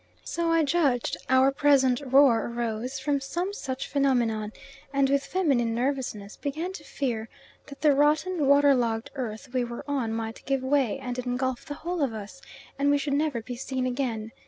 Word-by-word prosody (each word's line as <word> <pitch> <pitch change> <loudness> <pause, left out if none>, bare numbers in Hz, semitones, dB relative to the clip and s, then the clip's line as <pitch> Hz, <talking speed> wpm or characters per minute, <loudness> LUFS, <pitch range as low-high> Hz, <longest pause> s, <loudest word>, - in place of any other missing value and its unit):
So 335 -1 -1
I 330 -1 +4
judged 280 -5 +1
our 260 +1 +5
present 275 -2 +3
roar 265 -4 +4
arose 235 +2 -3
from 280 +1 0
some 350 +8 -3
such 265 -9 -4
phenomenon, 240 -6 +1 0.4
and 275 -1 +3
with 280 0 +2
feminine 265 -11 +1
nervousness 245 -5 -2
began 315 +6 -3
to 300 - -9
fear 235 -7 -3 0.4
that 280 -1 -11
the 300 -2 +5
rotten 300 +3 +2
water 280 0 +6
logged 230 -3 -1
earth 250 -2 -5
we 255 -1 +1
were 235 0 -6
on 265 -6 -1
might 225 0 -4
give 270 -1 0
way, 265 -4 +1
and 250 -2 -5
engulf 250 0 -2
the 290 -2 -6
whole 345 +2 -3
of 265 -5 +1
us, 215 +5 -8 0.4
and 285 0 +3
we 285 - +4
should 285 0 -2
never 285 -5 0
be 245 +2 -6
seen 260 +1 -3
again. 245 -4 -2
270 Hz, 180 wpm, -27 LUFS, 240-285 Hz, 0.4 s, water